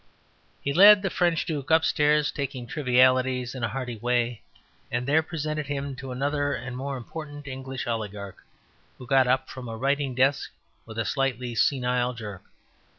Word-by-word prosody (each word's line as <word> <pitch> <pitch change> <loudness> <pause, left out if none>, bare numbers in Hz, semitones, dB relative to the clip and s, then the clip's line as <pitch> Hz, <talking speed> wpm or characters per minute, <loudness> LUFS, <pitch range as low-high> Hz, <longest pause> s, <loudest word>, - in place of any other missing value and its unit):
He 140 - -1
led 205 +3 +8
the 195 - -1
French 175 -3 +1
Duke 145 -5 -4
upstairs, 150 -2 +3
talking 135 -4 -4
trivialties 130 -1 +2
in 130 -3 -6
a - - +2
hearty 120 0 -5
way, 120 0 0 0.5
and 120 +1 -1
there 150 +4 +3
presented 155 -2 -4
him 140 -1 -3
to 135 0 -7
another 145 +2 -1
and 125 0 -6
more 135 +1 -4
important 145 +3 -8
English 130 -1 -5
oligarch, 105 -4 -5 0.5
who 125 - -10
got 130 +1 +4
up 130 +1 +1
from 125 -2 -8
a 115 - -5
writing 140 +1 0
desk 135 +2 +2 0.4
with 110 -1 -9
a 115 - 0
slightly 125 -1 -1
senile 125 0 +1
jerk. 105 -5 -7
130 Hz, 160 wpm, -26 LUFS, 125-145 Hz, 0.5 s, led